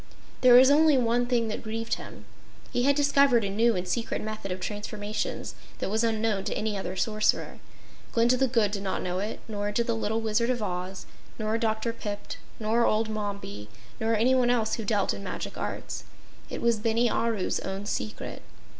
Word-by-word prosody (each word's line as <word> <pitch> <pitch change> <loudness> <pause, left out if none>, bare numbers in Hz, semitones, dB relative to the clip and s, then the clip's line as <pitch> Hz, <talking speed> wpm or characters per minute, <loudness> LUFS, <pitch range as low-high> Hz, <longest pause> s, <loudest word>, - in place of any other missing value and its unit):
There 250 -1 +8
was 260 +2 +8
only 305 -1 +6
one 240 0 +2
thing 240 -2 +1
that 215 - -3
grieved 225 +1 -3
him. - - -6 0.5
He 245 0 +1
had 280 0 +4
discovered 280 -4 +4
a 195 - -1
new 225 +3 +3
and 180 0 -2
secret 230 +5 -1
method 215 -3 -5
of 185 - -3
transformations 210 +1 -4 0.2
that - - -3
was 220 +2 +1
unknown 220 -3 +1
to - - -1
any 215 -1 -1
other 190 -2 -4
Sorcerer. 215 +2 0 0.5
Glinda 235 +2 +4
the 265 +1 +2
Good 230 -5 +2
did 200 -1 -3
not 190 -1 -2
know 180 0 -2
it, 210 +3 -4
nor 205 -2 -2
did 235 +3 +1
the 235 - 0
little 220 0 -1
Wizard 225 +2 +1
of 245 -3 0
Oz, 180 0 -4 0.3
nor 215 0 -1
Dr. 225 0 0
Pipt 205 -3 -6 0.2
nor 225 +2 +2
old 220 0 +2
Mombi, 200 - -5 0.3
nor 225 +1 +1
anyone 245 +2 +3
else 230 -3 +1
who 225 - -2
dealt 205 -2 +1
in 200 - -7
magic 185 - -5
arts. - - -4 0.5
It - - -5
was 235 -1 +3
Bini 230 +2 +2
Aru's 225 -4 0
own 195 +1 -5
secret. 105 - -4
220 Hz, 190 wpm, -27 LUFS, 205-235 Hz, 0.5 s, There